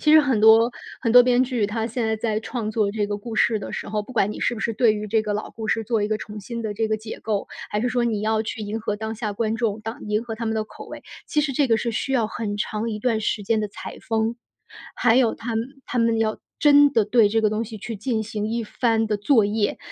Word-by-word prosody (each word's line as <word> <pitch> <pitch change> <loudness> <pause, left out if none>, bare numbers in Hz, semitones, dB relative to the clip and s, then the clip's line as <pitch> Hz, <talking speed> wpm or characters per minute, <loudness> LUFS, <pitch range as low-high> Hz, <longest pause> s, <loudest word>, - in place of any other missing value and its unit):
其 305 - +4
实 310 - +9
很 265 -7 +1
多 225 +2 +7 0.3
很 230 -3 0
多 245 0 +10
编 250 +1 +3
剧， 245 -4 -1
他 220 +2 -1
现 235 0 -2
在 220 0 0
在 215 -1 -1
创 220 0 -4
作 210 -2 +1
这 205 0 -1
个 205 0 -2
故 220 +1 -7
事 225 - +3
的 - - -7
时 - - -5
候， 210 0 -1
不 255 - -11
管 210 -3 +1
你 - - -8
是 - - +1
不 235 - -5
是 230 - 0
对 225 0 +4
于 210 0 -4
这 220 +1 +1
个 210 -1 -2
老 210 - -3
故 220 -1 -6
事 225 0 0
做 225 -2 0
一 205 - 0
个 215 0 0
重 210 0 -8
新 235 +3 -6
的 215 -2 -3
这 220 +1 -1
个 215 - +1
解 220 +1 -8
构， 210 -2 -1 0.2
还 210 - -1
是 245 - 0
说 245 -1 0
你 220 -3 0
要 220 0 +1
去 220 0 -5
迎 215 +2 -4
合 210 -1 -2
当 220 +1 -4
下 215 -2 -3
观 220 +1 -1
众， 225 -3 -1
当 225 +2 -6
迎 210 +2 0
合 225 -2 -5
他 230 +1 -5
们 220 0 -1
的 215 - -1
口 - - -12
味， - - -10 0.2
其 300 - +2
实 290 -2 -1
这 270 0 +2
个 225 - +4
是 230 +1 -2
需 270 +4 -2
要 235 -4 +2
很 210 -1 -4
长 215 +2 -2
一 210 - -4
段 225 -1 0
时 210 - -1
间 220 +1 +1
的 210 - -2
采 - - -8
风。 225 +1 -1 0.6
还 240 0 +3
有 245 -4 +3
他 230 -1 -4
们 225 +2 -1 0.2
他 245 - -3
们 230 -1 +3
要 220 -1 0 0.2
真 290 -1 +6
的 225 -5 +3
对 215 -1 +4
这 225 +2 +1
个 215 -1 +2
东 215 +2 -1
西 225 0 -8
去 220 +1 -6
进 220 +1 -1
行 210 -1 -4
一 230 +1 -1
番 225 0 0
的 210 - +1
作 220 +1 +3
业， 205 0 0
220 Hz, 305 characters per minute, -23 LUFS, 215-235 Hz, 0.6 s, 多